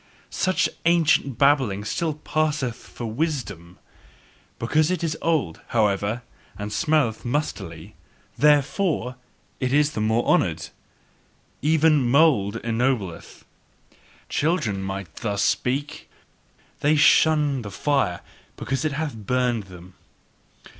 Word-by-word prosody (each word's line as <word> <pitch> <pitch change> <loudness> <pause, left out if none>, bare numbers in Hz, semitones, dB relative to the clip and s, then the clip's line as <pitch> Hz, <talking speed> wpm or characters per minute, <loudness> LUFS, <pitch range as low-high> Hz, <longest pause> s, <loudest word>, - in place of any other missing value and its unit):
Such 185 0 +1 0.2
ancient 155 -7 +3
babbling 130 -8 +2
still 160 +5 -2
passeth 150 -5 -1
for 120 - -9
"wisdom"; 110 - -4 0.8
because 155 +7 +1
it 180 -1 -1
is 160 -2 -1
old, 150 - 0
however, 105 +1 0 0.3
and 105 0 -5
smelleth 150 -8 +1
mustily, 100 - -4 0.4
THEREFORE 145 0 +2 0.4
is 145 +3 +2
it - - -13
the 105 - -2
more 110 +2 +1
honoured. 80 -2 +1 0.9
Even 155 0 +3
mould 135 -8 +3
ennobleth. 115 -6 -2 0.8
Children 145 - 0
might 95 -3 -6
thus 100 -3 -1
speak: 140 +4 -1 0.7
they 150 +2 +3
SHUN 150 -2 +4
the 105 - -7
fire 100 -2 0 0.4
because 135 +2 -2
it 155 -2 -1
hath 150 0 -3
burnt 120 0 -1
them! 90 0 -13
130 Hz, 105 wpm, -23 LUFS, 105-150 Hz, 0.9 s, SHUN